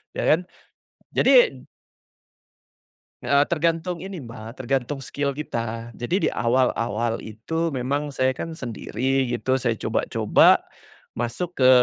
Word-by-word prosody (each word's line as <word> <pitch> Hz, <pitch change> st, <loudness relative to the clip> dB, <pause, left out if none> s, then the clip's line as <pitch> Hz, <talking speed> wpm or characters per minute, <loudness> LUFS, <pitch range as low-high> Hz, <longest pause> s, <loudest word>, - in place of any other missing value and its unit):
ya -, -, -2 dB
kan? 175 Hz, +3 st, +2 dB, 0.7 s
jadi -, -, +5 dB, 1.6 s
Eee, 140 Hz, 0 st, +3 dB
tergantung 165 Hz, +1 st, -1 dB
ini 190 Hz, 0 st, -6 dB
Mbka, 115 Hz, 0 st, -9 dB
tergantung 135 Hz, +2 st, -1 dB
skill 140 Hz, +2 st, -2 dB
kita, 115 Hz, -5 st, -4 dB
jadi 120 Hz, +9 st, -2 dB
di -, -, +2 dB
awal-awal 120 Hz, -2 st, 0 dB
itu 160 Hz, +10 st, -3 dB
memang 140 Hz, +3 st, -1 dB
saya 130 Hz, -1 st, +1 dB
kan 165 Hz, -, -5 dB
sendiri 125 Hz, +2 st, -1 dB
gitu, 125 Hz, +2 st, 0 dB
saya 115 Hz, -3 st, 0 dB
coba-coba -, -, +4 dB, 0.6 s
masuk 120 Hz, +10 st, -3 dB
ke 130 Hz, -, +7 dB
130 Hz, 115 wpm, -24 LUFS, 120-155 Hz, 1.6 s, ke